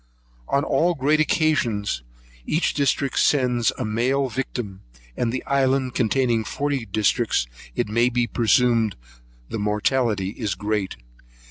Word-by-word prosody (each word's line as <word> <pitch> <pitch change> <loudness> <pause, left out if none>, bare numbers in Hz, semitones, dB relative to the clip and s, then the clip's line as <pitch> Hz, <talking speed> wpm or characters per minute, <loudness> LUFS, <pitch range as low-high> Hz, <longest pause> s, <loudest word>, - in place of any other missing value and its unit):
On 140 - +1
all 175 +1 +2
great 150 +3 +2
occasions, 125 - +1 0.5
each 160 - +1
district 140 -2 0
sends 125 -5 +2
a 125 - -2
male 130 +5 0
victim; 115 -6 -4 0.3
and 115 - 0
the 130 - -3
island 135 -2 +1
containing 120 -1 +1
forty 140 -2 -2
districts, 110 - +1 0.3
it - - 0
may 115 +3 +2
be 120 0 +1
presumed 115 -2 +2 0.5
the 115 - -3
mortality 105 -1 0
is 105 -2 -3
great. 105 0 -2
120 Hz, 125 wpm, -23 LUFS, 110-135 Hz, 0.5 s, all